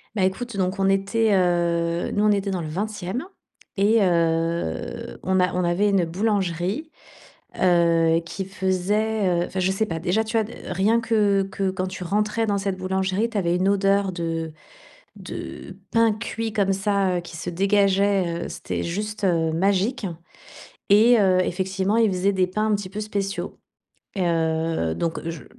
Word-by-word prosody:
Beh 190 Hz, -, +2 dB
écoute, 205 Hz, +3 st, -3 dB
donc 185 Hz, +1 st, -1 dB
on 195 Hz, 0 st, +3 dB
était, 200 Hz, +3 st, +2 dB
heu, 170 Hz, -2 st, +1 dB
nous, 205 Hz, -, 0 dB
on 210 Hz, -, +5 dB
était 200 Hz, -1 st, 0 dB
dans 185 Hz, -3 st, -2 dB
le 155 Hz, -, -5 dB
20e 205 Hz, -, -4 dB, 0.5 s
et 215 Hz, +3 st, +4 dB
heu, 165 Hz, -, -1 dB
on 190 Hz, 0 st, +1 dB
a 180 Hz, 0 st, +2 dB
on 180 Hz, 0 st, 0 dB
avait 175 Hz, +4 st, +2 dB
une 195 Hz, -3 st, +3 dB
boulangerie, 195 Hz, -, -1 dB, 0.7 s
heu, 170 Hz, -2 st, +4 dB
qui 195 Hz, +3 st, -5 dB
faisait, 190 Hz, 0 st, 0 dB
heu -, -, -2 dB
enfin 190 Hz, -, -4 dB
je 185 Hz, +1 st, +2 dB
sais 205 Hz, +3 st, 0 dB
pas, 165 Hz, -3 st, -4 dB
déjà, 190 Hz, +6 st, +1 dB
tu 225 Hz, +1 st, -3 dB
as 225 Hz, -, +4 dB, 0.3 s
rien 210 Hz, +6 st, +2 dB
que 210 Hz, -4 st, +2 dB
que 195 Hz, 0 st, -2 dB
quand 185 Hz, 0 st, -3 dB
tu 185 Hz, 0 st, -7 dB
rentrais 210 Hz, +4 st, 0 dB
dans 205 Hz, -1 st, 0 dB
cette 195 Hz, -1 st, -2 dB
boulangerie, 190 Hz, +4 st, -1 dB
tu 215 Hz, -, -2 dB
avais 175 Hz, -3 st, +1 dB
une 185 Hz, +2 st, +1 dB
odeur 200 Hz, 0 st, +2 dB
de 165 Hz, -2 st, -3 dB, 0.6 s
de -, -, -8 dB, 0.2 s
pain 230 Hz, -1 st, +4 dB
cuit 225 Hz, 0 st, -4 dB
comme 200 Hz, -2 st, +1 dB
ça, 195 Hz, -2 st, +1 dB
heu, -, -, -2 dB
qui 170 Hz, -1 st, -10 dB
se 170 Hz, -, -5 dB
dégageait, 195 Hz, -2 st, +2 dB
heu, -, -, -7 dB
c'était -, -, -4 dB
juste, 210 Hz, +5 st, -4 dB
heu, 165 Hz, -4 st, +2 dB
magique, 200 Hz, +6 st, +1 dB, 0.8 s
et 220 Hz, +3 st, +6 dB
heu, 185 Hz, -2 st, +4 dB
effectivement, 190 Hz, +3 st, -1 dB
ils 225 Hz, -2 st, +4 dB
faisaient 185 Hz, +2 st, +1 dB
des 185 Hz, -1 st, +1 dB
pains 215 Hz, +4 st, -1 dB
un -, -, +4 dB
petit 200 Hz, -2 st, -5 dB
peu 210 Hz, +3 st, -5 dB
spéciaux. 195 Hz, -3 st, -4 dB, 0.6 s
Et 180 Hz, -2 st, +1 dB
heu, 160 Hz, -, 0 dB
donc 165 Hz, -2 st, -2 dB
je 165 Hz, -3 st, -6 dB
190 Hz, 175 wpm, -23 LUFS, 175-205 Hz, 0.8 s, et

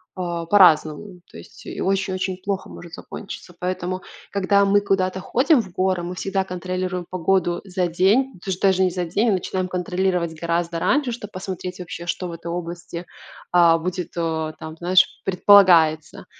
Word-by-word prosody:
а, 175 Hz, -2 st, -3 dB
по-разному. 180 Hz, 0 st, +3 dB
То -, -, -11 dB
есть -, -, -15 dB
и -, -, -6 dB
очень-очень 190 Hz, -1 st, -1 dB
плохо 195 Hz, -1 st, -3 dB
может 170 Hz, -2 st, -11 dB
закончиться. 180 Hz, -1 st, -9 dB
Поэтому, 185 Hz, 0 st, -3 dB, 0.3 s
когда 200 Hz, 0 st, +3 dB
мы 200 Hz, +1 st, +3 dB
куда-то 190 Hz, -2 st, 0 dB
ходим 260 Hz, -, +2 dB
в 190 Hz, -, -13 dB
горы, 185 Hz, -1 st, 0 dB
мы 175 Hz, +1 st, -4 dB
всегда 195 Hz, +1 st, -1 dB
контролируем 185 Hz, 0 st, -4 dB
погоду 175 Hz, -1 st, 0 dB
за 185 Hz, -2 st, -1 dB
день, 195 Hz, +8 st, +2 dB
даж 190 Hz, -2 st, -3 dB
даже 190 Hz, -1 st, +3 dB
не 185 Hz, -, +2 dB
за 180 Hz, 0 st, -2 dB
день, 205 Hz, +8 st, +1 dB
а -, -, +3 dB
начинаем 185 Hz, -1 st, -1 dB
контролировать 180 Hz, -2 st, -1 dB
гораздо 170 Hz, 0 st, -1 dB
раньше, 270 Hz, -, +1 dB
чтоб 215 Hz, -3 st, -7 dB
посмотреть 185 Hz, -1 st, -6 dB
вообще, 170 Hz, -1 st, -7 dB
что 180 Hz, +1 st, -3 dB
в 170 Hz, -, -7 dB
этой 170 Hz, 0 st, -7 dB
области, 170 Hz, 0 st, -6 dB, 0.4 s
а, 170 Hz, -2 st, +5 dB
будет, 180 Hz, 0 st, -4 dB
о, 160 Hz, -2 st, -2 dB
там, 160 Hz, 0 st, -8 dB
знаешь, 180 Hz, +2 st, +4 dB, 0.2 s
предполагается. 180 Hz, -5 st, +4 dB
180 Hz, 165 wpm, -22 LUFS, 170-190 Hz, 0.4 s, а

